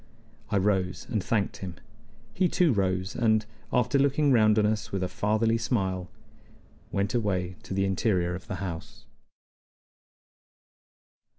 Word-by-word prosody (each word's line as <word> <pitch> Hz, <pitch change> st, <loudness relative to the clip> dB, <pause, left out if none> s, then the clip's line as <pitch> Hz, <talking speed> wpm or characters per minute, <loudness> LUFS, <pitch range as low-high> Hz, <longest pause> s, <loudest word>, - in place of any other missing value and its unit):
I 105 Hz, -, +1 dB
rose 95 Hz, -2 st, 0 dB
and 105 Hz, -5 st, 0 dB
thanked 105 Hz, -4 st, 0 dB
him. 90 Hz, -3 st, -6 dB, 0.6 s
He 180 Hz, +9 st, +2 dB
too 170 Hz, -6 st, +3 dB
rose, 95 Hz, -2 st, 0 dB
and, 110 Hz, -3 st, +2 dB, 0.3 s
after 125 Hz, +3 st, +2 dB
looking 140 Hz, +1 st, +3 dB
round 110 Hz, -3 st, +5 dB
on 105 Hz, -, +4 dB
us 105 Hz, 0 st, -1 dB
with 95 Hz, -1 st, -1 dB
a -, -, 0 dB
fatherly 110 Hz, +4 st, +1 dB
smile, 95 Hz, -6 st, -1 dB, 0.8 s
went 100 Hz, 0 st, 0 dB
away 95 Hz, -6 st, -1 dB
to -, -, -7 dB
the 95 Hz, 0 st, +2 dB
interior 95 Hz, -2 st, +1 dB
of 90 Hz, 0 st, -7 dB
the 95 Hz, -, -3 dB
house. 85 Hz, -3 st, -7 dB
100 Hz, 135 wpm, -27 LUFS, 95-115 Hz, 0.8 s, round